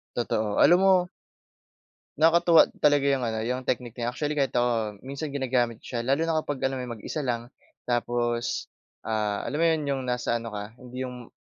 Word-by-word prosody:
Totoo, 110 -3 0
alam 175 +1 +7
mo 190 -2 +4 1.1
Nakakatuwa 165 +1 +6
talaga 145 -1 +3
yung 130 -3 +1
ano, 110 -1 -2
yung 125 +2 -3
technique 120 -1 -2
na 120 - -1
yan - - 0
actually 150 +2 -2
kahit 135 - 0
ako 115 -4 0
minsan 140 +2 -5
ginagamit 125 -4 0
ko 120 - -5
siya. - - 0
Lalo 140 +4 +2
na 165 -1 +1
kapag 145 -3 -5
alam 135 0 0
mo - - -4
yung 120 - -5
mag-isa 135 +6 -5
lang, 120 0 -2 0.4
tapos, 120 0 -1 0.3
ah, 105 -2 -1
alam 145 - -3
mo 165 - +3
'yon, 160 -2 +2
yung 135 -1 -1
nasa 125 -1 0
ano 115 -2 -7
ka 105 +1 -6
hindi 125 +1 -7
yung 125 -2 -8
125 Hz, 195 wpm, -26 LUFS, 120-145 Hz, 1.1 s, alam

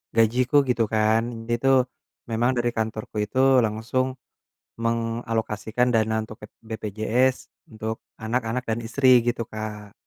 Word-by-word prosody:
gajiku 120 +4 +2
gitu 120 -2 +2
kan. 110 +1 +3 0.3
Dia 120 - +1
itu, 135 - +2 0.6
memang 120 +3 +2
dari 120 0 +1
kantorku 110 -1 -3
itu 120 +5 -3 0.3
langsung 115 +4 -1 0.8
mengalokasikan 115 0 -1
dana 110 -1 +2
untuk 110 0 -10
pep - - -21 0.2
BPJS, 110 +4 0 0.4
untuk 110 +1 -3 0.3
anak-anak 115 +2 -1
dan 110 +1 0
istri, 130 +2 +3 0.2
gitu 120 -1 0
Kak. 105 -1 -7
115 Hz, 125 wpm, -24 LUFS, 110-120 Hz, 0.8 s, kan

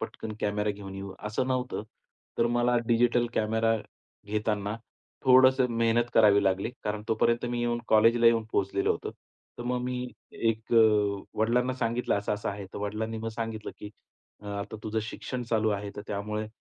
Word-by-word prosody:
पटकन 110 - -6
कॅमेरा 105 0 0
घेऊन 100 -1 -8
येऊ, 95 0 -6
असं 105 +5 -2
नव्हतं. 125 -4 -1 0.6
तर 115 - +4
मला 120 +1 +2
डिजिटल 120 0 +3
कॅमेरा 110 +1 +2 0.5
घेताना 105 0 -1 0.5
थोडंसं 130 0 +6
मेहनत 115 +1 +3
करावी 100 -2 +6
लागली. 95 +4 +1
कारण 105 0 -2
तोपर्यंत 115 +2 +2
मी 120 0 -2
येऊन 120 0 0
कॉलेजला 115 +2 +5
येऊन 115 -1 +4
पोहोचलेलो 100 0 +1
होतो. - - -5
तर 120 - -15
मग 125 0 -1
मी 125 0 -3 0.2
एक 115 0 -1
अ, 105 -3 +4
वडिलांना 125 +3 +2
सांगितलं 120 0 0
असं-असं 105 0 -2
आहे. 100 0 -6
तर - - -4
वडिलांनी 110 +2 -3
मग 115 - -3
सांगितलं, 115 -1 -4
की 105 - -8 0.6
आता 100 +1 -5
तुझं 110 +1 -1
शिक्षण 125 +3 -5
चालू 110 -1 +2
आहे. 100 0 -3
तर 105 - -5
त्यामुळे 105 +1 -3
110 Hz, 160 wpm, -28 LUFS, 105-120 Hz, 0.6 s, थोडंसं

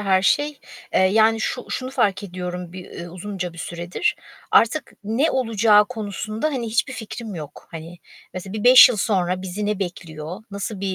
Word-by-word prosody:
her 190 -2 +2
şey. 290 +6 +1 0.3
Eee, - - +4
yani, 220 +4 +4
şu 250 +3 -2
şunu 255 0 -3
fark 200 -7 +1
ediyorum 180 -1 -6
bir 185 -1 -9
ı 175 - -10
uzunca 185 -1 -5
bir 170 - -14
süredir. 170 +1 -2 0.3
Artık 270 +6 +3
ne 230 +9 +1
olacağı 225 -4 +4
konusunda, 215 +1 -4
hani, 260 -6 -2
hiçbir 235 +3 0
fikrim 220 -2 -7
yok. 150 -4 -9
Hani, 165 +1 -9 0.4
mesela 185 +1 -6
bir 215 -1 -4
5 250 +1 +10
yıl 245 - -1
sonra 185 -3 0
bizi 190 +3 -4
ne 210 -1 -1
bekliyor? 170 0 -6
Nasıl 200 0 -5
bir, 195 -1 -1
200 Hz, 175 wpm, -22 LUFS, 180-225 Hz, 0.4 s, 5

